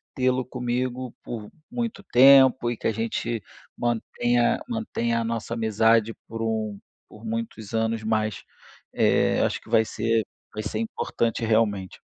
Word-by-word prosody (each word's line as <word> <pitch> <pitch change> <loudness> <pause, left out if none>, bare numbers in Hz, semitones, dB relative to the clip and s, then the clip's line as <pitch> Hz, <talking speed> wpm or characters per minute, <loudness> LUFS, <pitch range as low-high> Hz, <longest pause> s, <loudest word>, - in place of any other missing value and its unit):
tê-lo 130 0 +1
comigo 125 0 -3
por 110 -3 -6 0.2
muito 235 -5 -3
tempo 130 -4 +6
e - - -2
que - - -11
a - - +2
gente 115 +1 -2 0.4
mantenha 120 0 +1
mantenha 220 - -1
a - - -1
nossa 115 0 -3
amizade 115 0 +3
por 115 0 -6
um 110 -2 -2 0.3
por 110 +2 -13
muitos 110 -2 -5
anos. 115 0 0
Mas, 110 -1 -1 0.5
eh, - - +3
acho - - 0
que - - -17
vai 110 - +5
ser 115 0 0 0.3
vai 110 - -4
ser 110 - -3
importante 120 - -2
realmente. 105 -4 0
115 Hz, 145 wpm, -25 LUFS, 110-125 Hz, 0.5 s, tempo